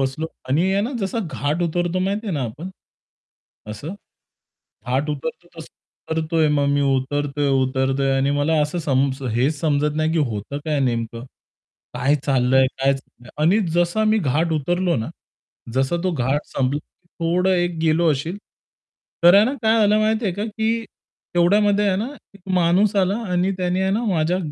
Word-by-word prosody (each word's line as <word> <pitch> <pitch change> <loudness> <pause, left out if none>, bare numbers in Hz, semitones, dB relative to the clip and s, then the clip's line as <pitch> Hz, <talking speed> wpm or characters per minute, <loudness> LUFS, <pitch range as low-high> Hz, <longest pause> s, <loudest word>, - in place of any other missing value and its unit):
बसलो 135 +4 -1 0.2
आणि 165 +8 +2
आहे 195 - +2
ना 240 +6 -3
जसा 195 +3 -2
घाट 150 +5 -1
उतरतो 175 +1 -1
माहिती 200 +4 -2
आहे 195 - -2
ना 140 - -1
आपण. 150 +11 -7 1.0
असं? 140 - -6 0.9
घाट 135 +4 0
उतरतो 160 +4 -5
तसं 160 - -9 0.4
उतरतोय 160 0 +1
मग 145 -1 +2
मी 145 0 +2
उतरतोय, 140 +1 0
उतरतोय 135 0 +1
आणि 135 +1 +1
मला 145 +3 +1
असं 150 +4 -2
सम 135 -1 +2 0.2
हेच 135 +6 +1
समजत 150 -1 0
नाही, 155 0 +1
की 165 - +1
होतं 120 0 -3
काय 150 -2 0
नेमकं. 115 -2 -2 0.7
काय 140 +3 +2
चाललंय 130 -1 +3
काय? 135 +1 +3 0.5
आणि 175 +8 +4 0.2
जसा 175 +5 +2
मी 220 - +3
घाट 160 +5 +1
उतरलो 175 +3 0
ना, 110 - -3 0.6
जसा 135 +6 +1
तो 185 - +1
घाट 135 -1 0
संपला, 135 +2 -1 0.4
थोडं 175 +3 +1
एक 175 -2 0
गेलो 160 +1 +3
असेल. 160 +7 -3 0.9
तर 175 - +8
आहे 205 +2 +6
ना 260 - -1
काय 220 0 +4
आलं 210 +1 +4
माहिती 220 +1 +1
आहे 190 - 0
का, 205 +2 -2
की 225 +1 -1 0.5
तेवढ्यामध्ये 205 +4 +3
आहे 190 - +2
ना 220 +5 -2 0.3
1 200 - -17 0.2
माणूस 185 +5 +3
आला 195 +1 +2
आणि 180 +2 +1
त्याने 180 0 0
आहे 190 0 +1
ना 220 +4 0
माझ्या 175 -3 +1
160 Hz, 165 wpm, -21 LUFS, 140-185 Hz, 1.0 s, तर